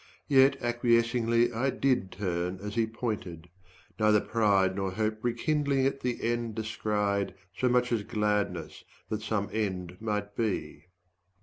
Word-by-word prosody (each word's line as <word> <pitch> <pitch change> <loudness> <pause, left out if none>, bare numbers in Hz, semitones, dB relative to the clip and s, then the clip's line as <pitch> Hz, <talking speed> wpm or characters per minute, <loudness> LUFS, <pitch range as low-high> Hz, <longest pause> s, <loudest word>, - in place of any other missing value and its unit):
Yet 135 -1 +5
acquiescingly 115 -1 +2
15 115 0 -4
I 135 - +2
did 130 -7 +1
turn 90 -1 -2
as 105 0 -4
he 115 0 +1
pointed: 105 -7 -5 0.5
neither 105 -1 +5
pride 100 -4 +2
Nor 95 -1 -2
hope 110 +1 -1
rekindling 135 +3 +1
at 135 0 0
the 125 -2 -3
end 115 -1 -1
descried, 105 -3 -1 0.2
So 125 - +1
much 125 0 +2
as 115 -3 +1
gladness 105 -4 -1 0.3
that 110 0 -2
some 105 -1 -1
end 90 -5 -2
might 105 -2 -3
be. 110 -4 -2
110 Hz, 140 wpm, -29 LUFS, 100-120 Hz, 0.5 s, Yet